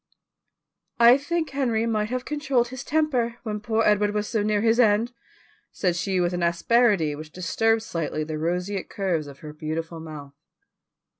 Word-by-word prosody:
"I 235 +1 +8
think 320 +4 -2
Henry 240 -5 0
might 215 -2 0
have 255 +1 -3
controlled 275 -5 0
his 260 +1 -7
temper, 270 -7 0
when 210 -3 -3
poor 220 +1 0
Edward 210 0 +2
was 210 0 -1
so 220 - 0
near 210 0 +1
his 230 +1 +3
end," 225 +1 +3 0.6
said 180 -3 0
she 185 +1 -1
with 175 0 +1
an 175 - -2
asperity 170 -1 +2
which 155 +1 -9
disturbed 225 +6 +1
slightly 160 -5 -3
the 155 0 -5
roseate 180 +4 -2
curves 180 -7 -1
of 140 -1 -12
her 150 -1 -8
beautiful 160 +2 -5
mouth. 150 -3 -9
210 Hz, 165 wpm, -25 LUFS, 170-235 Hz, 0.6 s, I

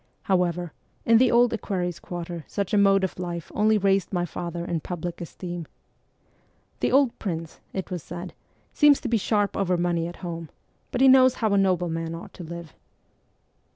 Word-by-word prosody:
However, 175 -3 0 0.3
in 230 0 +6
the 255 0 +5
Old 240 0 +4
Equerries' 180 -6 -2
Quarter 170 -2 -6
such 200 0 -3
a - - +4
mode 195 -1 +4
of 190 - -3
life 170 -2 -5
only 215 +1 +3
raised 195 -2 +1
my 175 -2 0
father 170 0 -5
in 170 -2 -1
public 175 +1 -5
esteem. 175 -1 -6 0.6
' - - -39
The - - +1
old 270 -2 +3
prince,' 165 -5 -4
it 190 0 -5
was 180 -2 -3
said, 175 +4 -7 0.2
' - - -39
seems 295 -2 +6
to - - -3
be 235 -1 +2
sharp 205 -1 0
over 185 -2 +1
money 170 -1 0
at 175 - -8
home; 165 -2 -5 0.4
but 250 - -2
he 270 - +7
knows 260 -1 +7
how 220 -3 0
a - - +4
nobleman 170 -3 0
ought 165 - -10
to 180 - -9
live.' 170 -1 -8
180 Hz, 190 wpm, -25 LUFS, 170-205 Hz, 0.6 s, he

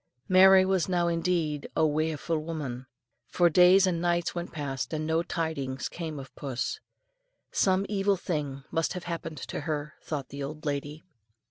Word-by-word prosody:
Mary 190 0 +7
was 190 -2 +1
now 175 -1 +2
indeed 165 -3 0
"a - - +2
waefu' 155 +2 0
woman," 150 -6 -4 0.4
for 175 -1 +3
days 180 +3 +7
and 175 -3 0
nights 175 -1 +1
went 175 0 -5
past, 140 -4 -4
and 155 0 -2
no 160 +1 +1
tidings 145 -6 -3
came 160 -3 -6
of 135 -1 -10
puss. 130 -4 -3 0.7
Some 190 0 +2
evil 200 -1 +1
thing 145 -6 -3
must 165 -1 0
have 180 -2 -6
happened 165 -2 -5
to - - -5
her, 150 -1 -3
thought 145 -4 -4
the 140 - -7
old 150 +3 -6
lady. 145 +1 -3
160 Hz, 160 wpm, -28 LUFS, 145-175 Hz, 0.7 s, Mary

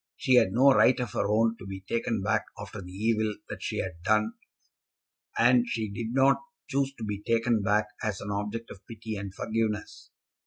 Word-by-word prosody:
She 130 - +1
had 120 -6 +6
no 130 +6 +6
right 130 -1 +5
of 120 -5 -2
her - - 0
own 115 +2 +2
to 95 - -9
be 95 0 -6
taken 110 +1 -2
back 110 +1 +1
after 100 0 -7
the 90 0 -10
evil 110 +2 0
that - - -6
she - - -3
had 90 -3 -4
done, 110 +4 +2 1.0
and 120 +1 +5
she 110 -3 -2
did 110 +2 -4
not 135 +2 +4 0.3
choose 140 -2 0
to 115 - -8
be 105 -1 -3
taken 115 0 +1
back 105 +2 +2 0.2
as 105 -2 -2
an 100 - -5
object 105 +3 -3
of 95 - -11
pity 110 -2 -6
and 100 -1 -5
forgiveness. 110 +1 -3
110 Hz, 195 wpm, -28 LUFS, 100-115 Hz, 1.0 s, had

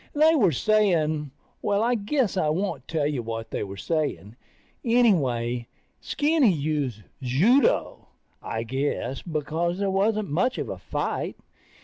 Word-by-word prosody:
They 310 +2 +5
were 215 - +4
saying... 160 - +2 0.3
Well, 205 +1 +1
I 240 +2 +2
guess 235 +1 0
I 160 -5 +1
won't 190 +6 -2
tell 155 -3 0
you 145 -4 -1
what 115 0 -5
they - - -2
were 100 -1 -7
saying. 145 - -2 0.5
Anyway, 130 - +2 0.3
Skinny 295 -6 +2
used 145 - -2 0.2
judo, 205 - +2 0.3
I 115 0 -3
guess, 130 +1 -2
because 165 +2 -2
there 200 -1 0
wasn't 205 -1 +1
much 250 - +1
of - - -3
a - - -5
fight. - - -3
165 Hz, 135 wpm, -25 LUFS, 135-215 Hz, 0.5 s, They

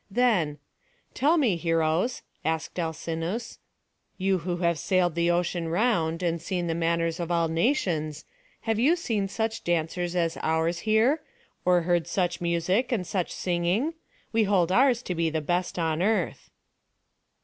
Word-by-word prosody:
Then, 195 -10 +2 0.6
"Tell 300 +7 +3
me, 235 - +2
heroes," 165 +7 0 0.2
asked 160 +2 -2
Alcinous, 165 +6 -3 0.6
"you 190 -1 +1
who 175 +1 -3
have 170 -2 +1
sailed 180 -3 +2
the 170 +1 +1
ocean 175 -1 0
round, 170 -4 +1
and 170 -1 0
seen 180 0 -2
the 165 - -1
manners 165 0 0
of 170 -1 -3
all 170 -1 +2
nations, 165 - 0 0.4
have 225 -1 -1
you 290 +9 +4
seen 225 - -1
such 220 +3 -3
dancers 175 +1 -1
as 170 -2 0
ours 160 +2 0
here? 230 +8 +3 0.4
or 180 -1 +4
heard 170 -1 +1
such 175 0 -1
music 175 +8 +1
and 210 -7 0
such 180 0 -2
singing? 180 - 0 0.4
We 225 -1 +3
hold 185 -4 +2
ours 250 +2 +4
to 180 - -3
be 165 -1 0
the 160 0 -1
best 175 +5 -1
on 165 -1 0
earth." 200 -3 0
175 Hz, 150 wpm, -27 LUFS, 165-210 Hz, 0.6 s, you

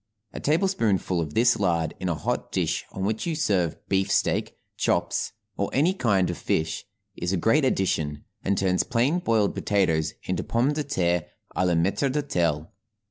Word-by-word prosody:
A - - -5
tablespoonful 115 - +1
of 75 -2 -5
this 120 0 +4
laid 85 -5 +1
in 95 - -2
a 85 - 0
hot 75 - -3
dish - - -1
on 95 - -5
which 110 - -1
you 165 - 0
serve 90 - +1
beefsteak, 95 0 +1 0.2
chops, - - 0 0.2
or 100 - 0
any 160 +8 +3
kind 100 - +2
of - - -7
fish, 80 0 -1 0.3
is 85 +1 -2
a 95 - +1
great 115 - +3
addition, 80 - 0 0.2
and 100 0 +1
turns 90 -1 +2
plain 130 +9 +1
boiled 110 - +2
potatoes 80 -7 +1
into - - -2
pomme 125 +5 +1
de 150 0 -1
terre 90 - 0 0.3
à 90 - +2
la 90 - +2
maître 95 +11 +1
d'hôtel. 85 - 0
95 Hz, 170 wpm, -26 LUFS, 85-125 Hz, 0.3 s, this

